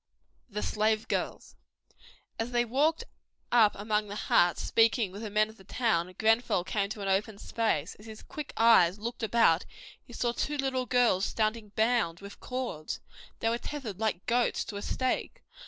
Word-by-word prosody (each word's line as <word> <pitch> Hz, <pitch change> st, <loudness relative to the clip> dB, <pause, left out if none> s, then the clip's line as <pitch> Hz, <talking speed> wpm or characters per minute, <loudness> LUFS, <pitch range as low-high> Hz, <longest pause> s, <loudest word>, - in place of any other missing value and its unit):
The 210 Hz, -1 st, -4 dB
Slave 215 Hz, 0 st, 0 dB
Girls -, -, -3 dB, 0.8 s
As 225 Hz, +1 st, -1 dB
they 240 Hz, -1 st, +1 dB
walked 290 Hz, +7 st, +1 dB, 0.5 s
up 225 Hz, -4 st, +5 dB
among 210 Hz, +1 st, -1 dB
the 205 Hz, -, -6 dB
huts, 175 Hz, -4 st, +2 dB
speaking 225 Hz, -3 st, +3 dB
with 200 Hz, +3 st, -8 dB
the 220 Hz, -, -5 dB
men 215 Hz, +1 st, +2 dB
of 220 Hz, +1 st, -15 dB
the 190 Hz, -, -16 dB
town, 185 Hz, -5 st, 0 dB
Grenfell 225 Hz, -4 st, +2 dB
came 200 Hz, +2 st, -1 dB
to 215 Hz, 0 st, -6 dB
an 195 Hz, -, -3 dB
open 200 Hz, +2 st, 0 dB
space. 200 Hz, -8 st, -1 dB
As 210 Hz, -, -13 dB
his 220 Hz, -1 st, -10 dB
quick 300 Hz, -2 st, -7 dB
eyes 205 Hz, -6 st, +5 dB
looked 235 Hz, +3 st, -5 dB
about 220 Hz, -7 st, +3 dB, 0.4 s
he -, -, -16 dB
saw 240 Hz, -, -1 dB
two 295 Hz, +5 st, -2 dB
little 260 Hz, -2 st, -1 dB
girls 240 Hz, -6 st, +3 dB
standing 215 Hz, -1 st, -1 dB
bound 220 Hz, -7 st, +1 dB
with 200 Hz, 0 st, -11 dB
cords. 250 Hz, -12 st, -4 dB, 0.4 s
They 225 Hz, -, +2 dB
were 235 Hz, +1 st, -1 dB
tethered 245 Hz, -11 st, -6 dB
like 210 Hz, -5 st, -1 dB
goats 240 Hz, +1 st, +1 dB
to 205 Hz, -, -6 dB
a -, -, -5 dB
stake. 260 Hz, -, -2 dB
220 Hz, 175 wpm, -29 LUFS, 200-240 Hz, 0.8 s, up